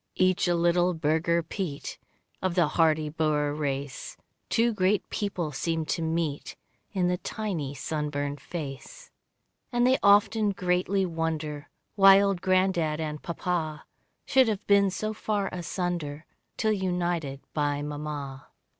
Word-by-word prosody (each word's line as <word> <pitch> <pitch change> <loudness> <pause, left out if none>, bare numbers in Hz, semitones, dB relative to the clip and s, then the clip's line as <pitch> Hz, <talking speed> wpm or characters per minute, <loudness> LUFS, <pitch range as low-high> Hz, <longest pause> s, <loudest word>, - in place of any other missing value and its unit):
Each 185 0 +2
a 175 - +2
little 175 +1 +2
Burgher 160 +2 +1
Piet 160 -4 -5 0.4
Of 185 -2 -1
the 170 -4 +3
hardy 155 -1 +2
Boer 150 -1 0
race, 140 -2 -4 0.3
Two 230 +1 +2
great 195 0 +1
peoples 175 -8 -2
seem 165 -1 -1
to 165 - -1
meet 160 -2 -2 0.4
In 185 -4 +1
the 180 0 0
tiny 170 -11 -3
sunburned 145 -1 -3
face. 175 - -7 0.6
And 240 -1 +2
they 260 +1 +4
often 205 +1 +4
greatly 185 +2 +1
wonder 160 -3 -3 0.2
Why 195 -1 +8
old 195 -3 +1
granddad 185 -4 +2
and 150 -1 -4
Papa, 170 -3 -3 0.4
Should 260 -2 +4
have 210 -2 -2
been 200 -1 +5
so 215 +3 -3
far 210 -2 -1
asunder, 175 -4 -3 0.3
Till 220 - +2
united 175 -7 -1
by 145 -1 0
mamma. 145 -2 -5
170 Hz, 130 wpm, -27 LUFS, 150-190 Hz, 0.6 s, Why